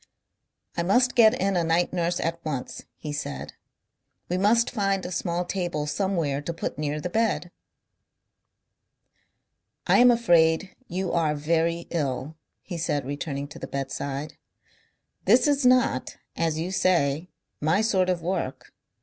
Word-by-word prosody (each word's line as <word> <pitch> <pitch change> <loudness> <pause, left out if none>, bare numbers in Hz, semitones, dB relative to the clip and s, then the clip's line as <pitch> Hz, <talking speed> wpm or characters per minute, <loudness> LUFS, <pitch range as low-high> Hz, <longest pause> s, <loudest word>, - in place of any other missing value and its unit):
"I - - 0
must 245 +9 +3
get 220 -2 +5
in 195 +1 +1
a 175 - +2
night 165 +2 +1
nurse 175 0 0
at 165 0 -2
once," 140 -5 -5
he 150 -1 -6
said. 145 -1 -5 0.8
"We 180 - 0
must 230 +4 +3
find 195 -4 0
a 180 - -5
small 175 0 -1
table 175 -5 -2
somewhere 160 -4 -1
to 170 +3 -4
put 165 - -5
near 150 0 -2
the 165 - -3
bed. 220 -5 0 2.3
"I - - +4
am 245 0 +8
afraid 175 -6 +3
you 185 +1 -2
are 160 -3 +1
very 165 +3 0
ill," 145 -2 -2 0.3
he 175 -3 -6
said, 150 -5 -1
returning 145 0 -4
to - - -10
the - - -6
bedside. 140 +2 -4 0.9
"This - - +5
is 280 -3 +3
not, 250 - +2 0.2
as 160 -2 0
you 170 +3 -3
say, 170 -3 +1 0.3
my 160 +7 +2
sort 190 -4 +2
of 175 -2 -1
work. 170 -7 -3
170 Hz, 145 wpm, -26 LUFS, 150-190 Hz, 2.3 s, am